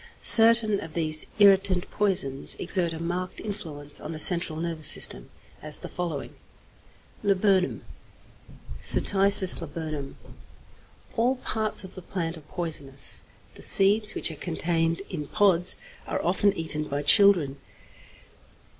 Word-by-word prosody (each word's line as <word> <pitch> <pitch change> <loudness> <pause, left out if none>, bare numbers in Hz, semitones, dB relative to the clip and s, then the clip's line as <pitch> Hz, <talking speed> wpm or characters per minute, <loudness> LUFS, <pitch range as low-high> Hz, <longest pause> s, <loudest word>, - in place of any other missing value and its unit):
Certain 225 -2 +6
of 165 -1 -11
these 155 -2 -1
irritant 195 -2 +3
poisons 180 -10 -1
exert 175 -3 -1
a 165 - -7
marked 175 +2 -5
influence 160 -9 -6
on - - -7
the - - -7
central 170 -1 +1
nervous 165 -2 -4
system, - - +1 0.3
as 155 -1 -3
the - - -10
following: 170 -6 -6 0.9
=Laburnum= 190 - 0 1.0
(Cytisis 195 -2 +5
Laburnum). 155 -3 -7 1.0
All 240 +3 0
parts 220 -4 0
of 190 0 -12
the 185 - -11
plant 170 -2 -5
are 160 - -12
poisonous; 150 -4 -6 0.3
the - - -15
seeds, 210 +2 +2
which - - +1
are - - -9
contained 165 +1 -2
in 150 -5 -6
pods, 190 -3 +1 0.3
are - - -3
often 190 +3 +1
eaten 155 -2 -1
by 145 0 -5
children. 175 -6 +3
175 Hz, 125 wpm, -25 LUFS, 155-200 Hz, 1.0 s, Certain